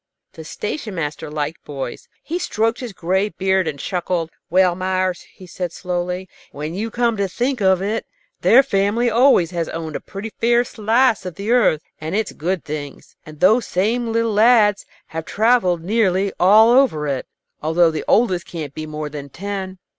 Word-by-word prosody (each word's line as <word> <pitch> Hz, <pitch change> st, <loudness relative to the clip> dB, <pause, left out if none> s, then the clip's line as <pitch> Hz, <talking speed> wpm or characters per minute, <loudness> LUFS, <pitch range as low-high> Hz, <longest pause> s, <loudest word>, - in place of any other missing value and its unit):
The 160 Hz, -, -10 dB
station 210 Hz, -, -5 dB
master 150 Hz, -2 st, -4 dB
liked 150 Hz, +1 st, -4 dB
boys. 135 Hz, -4 st, -6 dB, 0.2 s
He 340 Hz, +3 st, -3 dB
stroked 225 Hz, -6 st, 0 dB
his 245 Hz, -3 st, -6 dB
gray 190 Hz, +3 st, 0 dB
beard 190 Hz, -2 st, 0 dB
and 150 Hz, -2 st, -3 dB
chuckled. 175 Hz, 0 st, -2 dB, 0.2 s
"Well, 185 Hz, 0 st, +4 dB
Meyers," 185 Hz, 0 st, -1 dB
he 185 Hz, -, -14 dB
said, 180 Hz, 0 st, -5 dB
slowly, 180 Hz, +1 st, -3 dB, 0.2 s
"when 150 Hz, +3 st, -5 dB
you 215 Hz, +5 st, -3 dB
come 235 Hz, -1 st, 0 dB
to 200 Hz, -1 st, 0 dB
think 245 Hz, +5 st, -2 dB
of 190 Hz, -1 st, +3 dB
it, 215 Hz, +3 st, -2 dB, 0.3 s
their 265 Hz, +4 st, +6 dB
family 225 Hz, +1 st, +1 dB
always 230 Hz, -, +4 dB
has 170 Hz, -2 st, -2 dB
owned 160 Hz, -2 st, -5 dB
a -, -, -2 dB
pretty 210 Hz, +3 st, -8 dB
fair 240 Hz, +1 st, +4 dB
slice 225 Hz, 0 st, +1 dB
of 180 Hz, -3 st, -6 dB
the 200 Hz, +4 st, -3 dB
earth 205 Hz, -11 st, +3 dB, 0.2 s
and 160 Hz, +4 st, -4 dB
its 220 Hz, 0 st, -1 dB
good 175 Hz, +3 st, -3 dB
things, 145 Hz, -1 st, -7 dB
and 155 Hz, -1 st, -12 dB
those 220 Hz, +5 st, +4 dB
same 225 Hz, +5 st, 0 dB
little 230 Hz, -1 st, 0 dB
lads 215 Hz, -2 st, +4 dB, 0.2 s
have 160 Hz, 0 st, -5 dB
travelled 205 Hz, -7 st, +2 dB
nearly 195 Hz, -1 st, +1 dB
all 215 Hz, +5 st, +6 dB
over 245 Hz, -, +3 dB
it, 135 Hz, -2 st, -2 dB, 0.3 s
although 165 Hz, +2 st, +3 dB
the 155 Hz, -, -4 dB
oldest 190 Hz, -6 st, +2 dB
can't 155 Hz, -6 st, -6 dB
be 155 Hz, +1 st, -6 dB
more 155 Hz, 0 st, -5 dB
than 145 Hz, -1 st, -8 dB
ten. 190 Hz, +3 st, -5 dB
190 Hz, 175 wpm, -20 LUFS, 165-225 Hz, 0.3 s, their